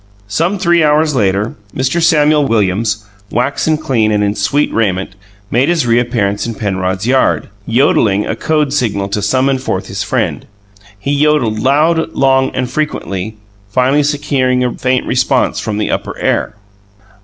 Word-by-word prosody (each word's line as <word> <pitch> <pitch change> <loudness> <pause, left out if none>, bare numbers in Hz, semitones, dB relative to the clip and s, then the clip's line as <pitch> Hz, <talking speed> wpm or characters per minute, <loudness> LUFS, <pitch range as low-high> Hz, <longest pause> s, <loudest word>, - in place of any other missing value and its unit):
Some 170 - 0
three 175 -3 +3
hours 150 +1 +2
later, 105 -2 0 0.2
Mr. 135 +6 0
Samuel 150 -3 +3
Williams, 105 0 0 0.2
waxen 140 +6 0
clean 115 -8 0
and 105 -1 +1
in 100 0 +1
sweet 145 +7 0
raiment, 95 -5 0 0.4
made 130 +6 +2
his 170 -6 +1
reappearance 115 -4 0
in 115 - -4
Penrod's 95 -1 -2
yard, 130 +2 +1 0.2
yodelling 110 -4 +2
a - - -2
code 150 -3 0
signal 100 -8 -1
to 105 +1 -2
summon 130 +5 +1
forth 130 - -3
his - - -5
friend. - - -2 0.5
He 100 +8 -3
yodelled 145 -7 +2
loud, 155 +6 +2
long, 135 -1 +2
and 125 -1 -1
frequently, 110 -8 -3 0.3
finally 130 +6 +2
securing 140 -3 0
a 125 -1 -1
faint 130 0 0
response 130 +1 +1
from 110 -3 -3
the 105 - -1
upper - - -3
air. - - -1
125 Hz, 150 wpm, -14 LUFS, 105-145 Hz, 0.5 s, three